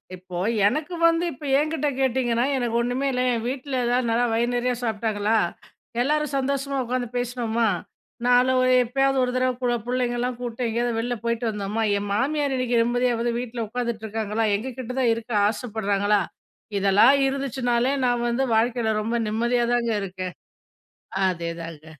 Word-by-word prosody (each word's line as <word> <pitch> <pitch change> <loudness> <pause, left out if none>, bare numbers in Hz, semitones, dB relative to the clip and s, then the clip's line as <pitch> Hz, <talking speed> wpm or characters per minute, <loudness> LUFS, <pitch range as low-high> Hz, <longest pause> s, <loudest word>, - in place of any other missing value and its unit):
இப்போ, 180 -1 -9 0.3
எனக்கு 305 - -2
வந்து 330 +1 +2
இப்ப 270 - -12
என்கிட்ட 305 +1 0
கேட்டீங்கன்னா, 245 -2 +1
"எனக்கு 240 -2 -1
ஒன்னுமே 250 +3 -1
இல்ல" 250 -1 0
என் 230 -1 -2
வீட்ல 265 +1 -3
எதாவது 245 +1 +1
நல்லா 230 +2 +2
வயுறு 235 +2 +1
நறைய 250 +1 +1
சாப்பிட்டாங்களா, 220 -1 0 0.7
எல்லாரும் 300 +2 0
சந்தோஷமா 275 +1 -1
உக்காந்து 245 0 -2
பேசினோமா, 235 -2 0 0.6
நாள 245 +1 +5
ஒரு 255 0 +3
எப்பயாவது 270 +3 +1
ஒரு 250 - 0
தடவ 255 0 +2
கூட 245 -1 +1
பிள்ளைங்களலாம் 245 0 -1
கூப்பிட்டு 245 0 -3
எங்கேயாவது 235 0 -1
வெளில 245 +2 -1
போயிட்டு 235 0 -1
வந்தோமா, 210 +1 -2 0.2
என் 205 0 -5
மாமியார் 280 +4 0
இன்னைக்கு 245 -2 +2
நிம்மதியா 245 +1 +1
வந்து 240 0 0
வீட்ல 240 -2 -4
உட்காந்துட்டு 235 -1 -3
இருக்காங்களா? 220 0 -1
எங்கள்கிட்ட 250 +3 -5
தான் 245 -3 +3
இருக்க 230 +1 -7 0.2
ஆசப்படுறாங்களா, 205 -2 0 0.6
இதெல்லாம் 200 +6 +5
இருந்துச்சுனாலே, 265 -2 0
நான் 245 -1 +1
வந்து 250 +3 +1
வாழ்க்கைல 230 0 +1
ரொம்ப 225 +3 -2
நிம்மதியா 235 +3 +1
தாங்க 235 -1 0
இருக்கேன். 185 -1 -5 0.9
அதேதாங்க. 165 -3 -4
240 Hz, 145 wpm, -24 LUFS, 225-255 Hz, 0.9 s, நாள